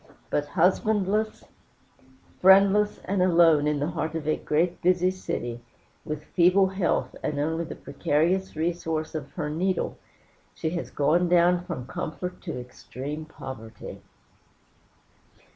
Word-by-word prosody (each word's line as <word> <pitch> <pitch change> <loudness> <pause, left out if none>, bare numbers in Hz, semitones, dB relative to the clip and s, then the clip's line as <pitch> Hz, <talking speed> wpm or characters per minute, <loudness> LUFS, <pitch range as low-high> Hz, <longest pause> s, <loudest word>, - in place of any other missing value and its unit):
But 145 0 0
husbandless, 205 +5 +1 1.0
friendless, 195 +2 +5
and 195 -1 0
alone 165 -4 +5
in 150 -1 +1
the 145 +4 -1
heart 160 -1 -3
of 155 -2 -4
a 155 - +3
great, 170 +4 0
busy 180 +1 +3
city, 120 -10 -4 0.4
with 150 0 -4
feeble 185 +4 +4
health, 190 -2 -1
and 150 - -2
only 160 +3 -1
the - - -7
precarious 170 +4 0
resource 160 -1 -2
of 145 -3 -5
her 160 -5 -3
needle, 175 +5 -1 0.6
she 160 - -2
has 170 0 -4
gone 170 +5 +2
down 175 0 +4
from 170 -9 -5
comfort 180 +6 -5
to 165 -8 -5
extreme 135 +4 -7
poverty. 115 -8 -9
170 Hz, 125 wpm, -26 LUFS, 150-185 Hz, 1.0 s, friendless